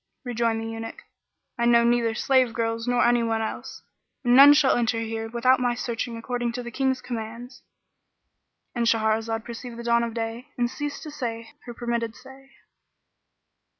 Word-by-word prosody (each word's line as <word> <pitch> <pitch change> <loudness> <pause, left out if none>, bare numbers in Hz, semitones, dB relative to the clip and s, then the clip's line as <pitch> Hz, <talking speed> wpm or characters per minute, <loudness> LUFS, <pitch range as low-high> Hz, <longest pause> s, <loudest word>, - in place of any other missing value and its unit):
Rejoined 230 -2 0
the 225 - -5
Eunuch, 225 0 -7 0.6
"I 235 - +2
know 235 0 +5
neither 235 -1 +2
slave 255 -1 +2
girls 230 0 -2
nor 245 0 +3
anyone 230 -2 +2
else; 220 - -6 0.4
and 245 -1 +4
none 280 +2 +10
shall 290 -3 +4
enter 230 -1 +1
here 225 0 -4
without 250 +2 +3
my 245 -1 +1
searching 235 -1 -4
according 240 0 -3
to 245 0 -4
the 240 - -7
King's 265 +1 0
commands."—And 235 0 -9
Shahrazad 225 0 +1
perceived 235 0 -8
the 235 - -7
dawn 235 0 +3
of 230 -1 -4
day 230 +3 -4
and 240 0 0
ceased 290 +1 -5
to 305 - -7
say 230 -6 -5
her 240 - -8
permitted 235 -1 -2
say. 265 +1 -15
235 Hz, 160 wpm, -25 LUFS, 225-245 Hz, 0.6 s, none